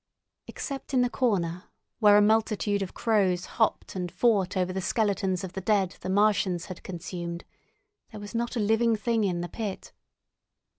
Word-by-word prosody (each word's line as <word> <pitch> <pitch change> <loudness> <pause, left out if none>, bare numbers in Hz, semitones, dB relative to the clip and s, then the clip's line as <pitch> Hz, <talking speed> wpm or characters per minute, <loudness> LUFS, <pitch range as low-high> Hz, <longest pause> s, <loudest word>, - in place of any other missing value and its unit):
Except 275 -1 -5
in 255 - +4
the 245 - 0
corner, 180 -7 0 0.3
where 205 -2 +7
a 210 - +6
multitude 215 -1 +2
of 190 - -5
crows 190 -5 +1
hopped 220 -3 -1
and 180 -2 -3
fought 195 -2 +2
over 185 0 0
the 190 - -2
skeletons 195 -1 0
of 185 -1 -6
the 190 - -4
dead 195 -2 +1
the - - -5
Martians 195 -3 +2
had 185 - -8
consumed, 170 -1 -6 0.6
there 215 - -9
was 205 +2 -9
not 235 +1 -2
a - - 0
living 225 +2 +3
thing 225 +1 0
in 180 -3 0
the 175 - -3
pit. 205 -1 -6
200 Hz, 170 wpm, -27 LUFS, 185-220 Hz, 0.6 s, where